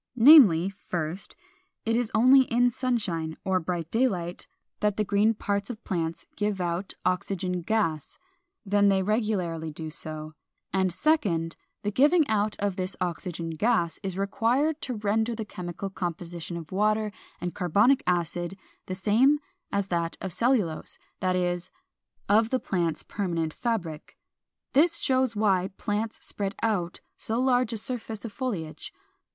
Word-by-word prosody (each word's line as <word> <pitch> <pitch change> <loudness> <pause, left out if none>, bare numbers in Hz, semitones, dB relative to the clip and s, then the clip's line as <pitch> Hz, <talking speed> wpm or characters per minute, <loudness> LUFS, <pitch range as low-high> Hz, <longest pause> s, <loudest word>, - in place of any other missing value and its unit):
Namely, 225 - +8 0.2
1st, 175 +2 -3 0.5
it 225 0 +1
is 240 -2 +1
only 255 +4 +7
in 245 0 +3
sunshine 195 -11 -1
or 190 -1 +2
bright 170 -1 -3
daylight 190 -8 0 0.3
that 210 -1 +1
the 215 - +2
green 210 +2 +2
parts 200 0 -2
of 230 -2 -7
plants 165 -3 -2
give 210 -1 -1
out 175 +2 -2
oxygen 180 -1 -1
gas, 165 -6 -1 0.5
then 205 0 +4
they 190 -1 +3
regularly 185 -7 -1
do 155 +1 -6
so; 155 -1 -6 0.4
and 190 -1 +2
2d, 180 - +1 0.3
the 205 - -1
giving 295 - +4
out 210 -1 +1
of 200 -1 -1
this 185 +1 -2
oxygen 175 -2 -3
gas 170 -1 +1
is 190 -2 -4
required 245 +10 +1
to 255 - -3
render 220 +2 0
the 220 -1 -4
chemical 180 0 -6
composition 175 -1 -5
of 160 -2 -9
water 215 +2 +1 0.3
and 175 -1 -3
carbonic 210 - +3
acid 175 +1 -1 0.3
the 185 - -3
same 230 +10 +4 0.3
as 200 -1 -1
that 170 -1 -1
of 190 -3 -5
cellulose, 230 -9 0 0.2
that 185 -1 +1
is, 175 -1 -1 0.6
of 220 +2 +4
the 260 - +1
plant's 170 -7 -1
permanent 170 -6 -2
fabric. 185 -11 -3 0.6
This 335 +5 +4
shows 260 -5 +1
why 195 -3 +2
plants 215 +1 -3
spread 200 -1 -3
out 185 -6 -1 0.2
so 225 +2 0
large 250 -2 +2
a 225 - -2
surface 225 -1 -4
of 220 - -6
foliage. 200 -13 -4
200 Hz, 145 wpm, -27 LUFS, 175-225 Hz, 0.6 s, Namely